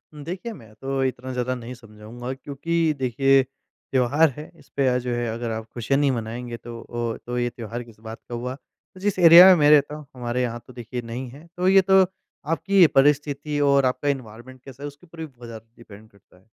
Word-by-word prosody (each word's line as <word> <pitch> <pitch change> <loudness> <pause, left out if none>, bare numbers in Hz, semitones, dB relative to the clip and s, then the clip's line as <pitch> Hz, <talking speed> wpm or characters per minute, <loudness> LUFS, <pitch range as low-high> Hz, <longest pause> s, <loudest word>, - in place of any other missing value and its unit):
देखिए, 180 +10 -6
मैं 110 - -15
तो 135 +2 -2
इतना 130 0 -3
ज़्यादा 125 0 -1
नहीं 120 0 -8
समझाऊँगा 115 +1 -9
क्योंकि 155 +4 -1
देखिए 135 +2 +3
त्योहार 135 +2 0
है, 150 - -9
इसपे 140 -1 -2
अ, 125 -1 +2
जो 125 0 -3
है 120 0 -2
अगर 115 0 -4
आप 110 0 -5
खुशियाँ 130 +4 0
नहीं 145 -2 +2
मनाएँगे 120 0 -5
तो 115 0 -9
ओ 120 -1 -3
तो 120 0 -4
ये 120 0 0
त्योहार 120 0 -7
किस 115 -3 -18
बात 110 0 -9
का 120 - -4
हुआ? 125 +2 -4
तो 165 +7 -22
जिस 200 0 -1
एरिया 170 +1 +10
में 190 -1 +8
मैं 145 0 +5
रहता 150 0 +4
हूँ, 150 -1 -10
हमारे 125 0 -2
यहाँ 120 -1 -3
तो 130 - -13
देखिए 120 +1 -6
नहीं 120 +2 -6
है। 140 +6 -14
तो 180 +1 0
ये 195 0 +6
तो 190 +1 +5 0.5
आपकी 190 +2 +4
परिस्थिति 145 +1 +1
और 140 -1 +3
आपका 130 +3 -1
एनवायरनमेंट 130 -1 -6
कैसा 135 +1 -11
है, - - -3
उसके 145 +4 -13
ऊपर 165 0 -15
भी 160 - -4
बहुत 125 -5 -14
ज़्यादा 115 -1 -10
डिपेंड 110 -2 -15
करता 100 -3 -25
है। 90 - -26
130 Hz, 215 wpm, -23 LUFS, 120-145 Hz, 0.5 s, एरिया